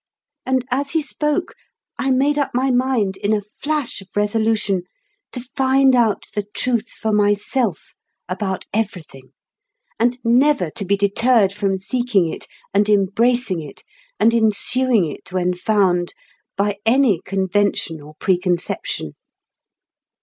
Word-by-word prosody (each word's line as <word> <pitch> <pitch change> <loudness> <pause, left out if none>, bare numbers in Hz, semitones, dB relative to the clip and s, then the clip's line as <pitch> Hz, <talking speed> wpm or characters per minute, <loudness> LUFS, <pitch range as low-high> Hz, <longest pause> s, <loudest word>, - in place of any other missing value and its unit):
And 260 -1 +1
as 275 +2 0
he 320 - +2
spoke, 300 +4 -2 0.5
I 270 - 0
made 280 +3 +2
up 280 - -2
my 260 +1 +2
mind, 245 -6 +1
in 205 +2 0
a 215 - +2 0.2
flash 295 -7 -2
of 195 - -14
resolution, 210 -2 +1 0.5
to 250 - -4
find 265 0 +4
out 230 -4 +2
the 205 - -1
Truth 240 -3 0
for 220 - -3
myself 205 - 0 0.3
about 190 0 -3
everything, 180 -11 -4 0.7
and 245 +1 +2
never 245 - +3
to 200 - -3
be 200 +2 +1
deterred 200 +1 +3
from 200 -2 -1
seeking 210 -2 +1
it, - - -7 0.3
and 205 +1 +2
embracing 210 0 +2
it, 145 -3 -11 0.4
and 230 - +4
ensuing 230 0 +3
it 155 - -7
when 180 -1 0
found, 180 -2 +1 0.4
by 200 0 0
any 230 -6 +3
convention 190 -4 -1
or 150 +1 -13
preconception. 175 - -1
210 Hz, 130 wpm, -20 LUFS, 190-250 Hz, 0.7 s, find